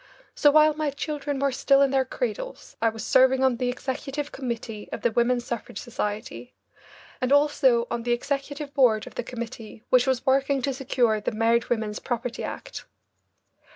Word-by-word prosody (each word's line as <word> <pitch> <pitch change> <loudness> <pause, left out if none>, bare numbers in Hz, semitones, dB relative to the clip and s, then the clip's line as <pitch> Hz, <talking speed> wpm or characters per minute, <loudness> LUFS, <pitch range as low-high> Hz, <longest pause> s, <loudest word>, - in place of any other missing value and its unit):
So 295 - +4
while 305 +1 +5
my 305 0 -1
children 290 0 -3
were 275 0 +1
still 275 +2 +4
in 275 - +2
their 265 -1 +2
cradles - - -5
I 225 - +4
was 225 0 -7
serving 260 0 +4
on 260 -2 +3
the 250 0 -1
executive 275 +3 -4
committee 235 -4 -5
of - - -6
the 235 - +2
Women's 240 +1 +1
Suffrage 235 -4 -5
Society, 220 +1 -5 0.7
and 255 +1 0
also 280 -5 +4
on 235 - -2
the 240 +1 -2
executive 280 +3 -3
board 235 -7 +3
of - - -11
the - - -3
committee 230 -2 -8
which 255 0 +5
was 260 -2 0
working 270 0 +2
to 275 - 0
secure 245 -5 +1
the - - -2
Married 230 +1 +1
Women's 220 -3 -1
Property 240 -1 -4
Act. - - -7
255 Hz, 175 wpm, -25 LUFS, 235-280 Hz, 0.7 s, while